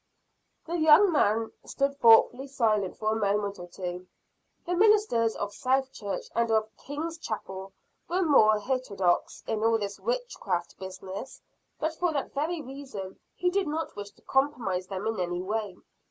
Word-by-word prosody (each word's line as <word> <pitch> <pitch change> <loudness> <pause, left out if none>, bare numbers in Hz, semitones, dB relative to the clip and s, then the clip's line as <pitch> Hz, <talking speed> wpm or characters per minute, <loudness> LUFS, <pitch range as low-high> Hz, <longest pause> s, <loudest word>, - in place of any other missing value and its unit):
The 340 +1 -2
young 315 +5 +7
man 225 -6 +2
stood 280 0 -1
thoughtfully 245 +3 +6
silent 215 -8 0
for 215 0 0
a - - +1
moment 200 -1 0
or 175 - -8
two. 180 0 -6 0.6
The 355 - -1
ministers 390 - +4
of 205 - -4
South 265 +1 0
Church 200 -2 -4
and 235 0 +1
of 220 0 +1
King's 320 +4 -5
chapel 190 -6 -6 0.4
were 365 +2 +1
more 215 -9 +5
heterodox 205 -7 0
in 220 -1 -2
all 225 0 +4
this 205 -2 -5
witchcraft 485 - -3
business; 190 +4 -7 0.4
but 315 +1 -1
for 350 +1 0
that 280 - -3
very 310 +3 -2
reason 260 -8 -8 0.2
he 360 0 +1
did 390 -2 +1
not 315 +2 -3
wish 205 0 -6
to - - -27
compromise 235 -10 0
them 195 +1 -5
in 220 -2 -1
any 175 0 -2
way. 210 -1 -3
225 Hz, 160 wpm, -28 LUFS, 200-295 Hz, 0.6 s, young